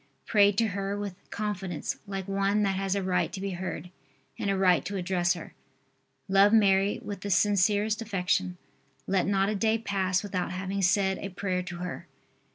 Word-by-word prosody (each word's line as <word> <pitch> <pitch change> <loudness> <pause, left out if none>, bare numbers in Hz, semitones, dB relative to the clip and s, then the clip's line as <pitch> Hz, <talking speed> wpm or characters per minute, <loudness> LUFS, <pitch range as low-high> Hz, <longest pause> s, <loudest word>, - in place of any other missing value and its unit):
Pray 205 -2 +5
to 220 +2 +1
her 200 +1 -3
with 205 -2 -4 0.2
confidence 195 -5 -3
like 195 -2 -4
one 195 +1 +1
that 195 -1 +1
has 195 0 -1
a 200 - -1
right 180 -2 0
to - - -6
be 195 0 -3
heard 180 0 -5 0.5
and 200 - -1
a 195 - +1
right 185 -3 +4
to 200 - -5
address 180 -2 +1
her. 170 - -9 0.7
Love 195 +1 +5
Mary 200 -2 +4
with 205 -2 -5
the 205 - -4
sincerest 205 +3 +2
affection. 185 -3 -1 0.5
Let 190 -1 +1
not 195 0 +2
a - - 0
day 220 +2 +2
pass 195 -4 0
without 185 -3 -3
having 195 +2 -3
said 190 0 +2
a 200 - -5
prayer 185 -1 -2
to 175 -1 -7
her. 180 0 -6
195 Hz, 180 wpm, -28 LUFS, 185-200 Hz, 0.7 s, Pray